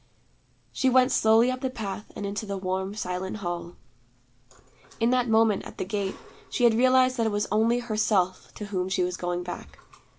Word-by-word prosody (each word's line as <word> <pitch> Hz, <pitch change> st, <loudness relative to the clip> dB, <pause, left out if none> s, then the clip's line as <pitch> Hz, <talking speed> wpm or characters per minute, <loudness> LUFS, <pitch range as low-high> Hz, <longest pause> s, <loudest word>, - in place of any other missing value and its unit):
She 265 Hz, -, +1 dB
went 255 Hz, 0 st, +4 dB
slowly 225 Hz, +3 st, +4 dB
up 255 Hz, 0 st, -5 dB
the 260 Hz, -, -1 dB
path 210 Hz, -4 st, -6 dB
and 205 Hz, -, -5 dB
into 205 Hz, +2 st, -4 dB
the 200 Hz, 0 st, -3 dB
warm 190 Hz, +1 st, -3 dB
silent 185 Hz, 0 st, -4 dB
hall. 175 Hz, -3 st, -5 dB, 1.2 s
In 230 Hz, +1 st, +2 dB
that 250 Hz, -2 st, +1 dB
moment 220 Hz, -2 st, +3 dB
at -, -, -11 dB
the -, -, -3 dB
gate, 200 Hz, 0 st, -2 dB, 0.3 s
she 245 Hz, -, -2 dB
had 235 Hz, -1 st, +6 dB
realized 255 Hz, +2 st, +4 dB
that 230 Hz, -1 st, +1 dB
it -, -, 0 dB
was 205 Hz, 0 st, 0 dB
only 225 Hz, +3 st, +3 dB
Herself 215 Hz, -6 st, 0 dB
to 210 Hz, -, -6 dB
whom 185 Hz, -2 st, -2 dB
she 190 Hz, -1 st, +1 dB
was 180 Hz, 0 st, -2 dB
going 175 Hz, 0 st, -3 dB
back. 175 Hz, -, -8 dB
210 Hz, 190 wpm, -26 LUFS, 190-235 Hz, 1.2 s, had